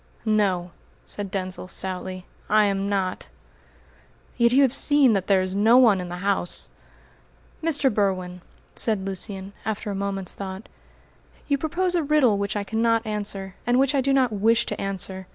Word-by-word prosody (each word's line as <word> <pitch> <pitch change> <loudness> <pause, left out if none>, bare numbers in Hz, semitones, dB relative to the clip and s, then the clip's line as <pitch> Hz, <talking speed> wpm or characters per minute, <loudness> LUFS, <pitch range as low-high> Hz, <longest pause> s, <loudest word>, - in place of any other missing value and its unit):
"No," 195 -5 +1 0.3
said 205 -1 -4
Denzil 185 -1 -4
stoutly, 185 0 -5 0.2
"I 215 0 +5
am 195 0 -1
not!" 190 -2 -2 1.1
"Yet 235 -1 +3
you 270 +3 +5
have 265 -2 +2
seen 280 -4 +4
that 195 -2 -1
there 190 -2 +3
is 185 0 -3
no 220 +4 +5
one 220 -7 +5
in 180 - -6
the 175 - -5
house!" 195 -3 0 0.9
"Mr. 290 -6 +1
Berwin," 185 -3 -1 0.3
said 215 -4 -1
Lucian, 195 0 -5
after 215 0 -3
a - - -3
moment's 195 -2 -3
thought, 190 +1 -7 0.8
"you 280 -2 +1
propose 350 +4 0
a 345 - +2
riddle 280 -9 +3
which 200 +1 -2
I 205 - -1
cannot 225 +3 +1
answer, 205 -3 -4
and 245 +1 +3
which 270 +2 +3
I 275 - +2
do 275 +1 +1
not 260 -3 +3
wish 225 +3 +2
to - - -4
answer. 190 -1 -4
205 Hz, 170 wpm, -24 LUFS, 190-240 Hz, 1.1 s, I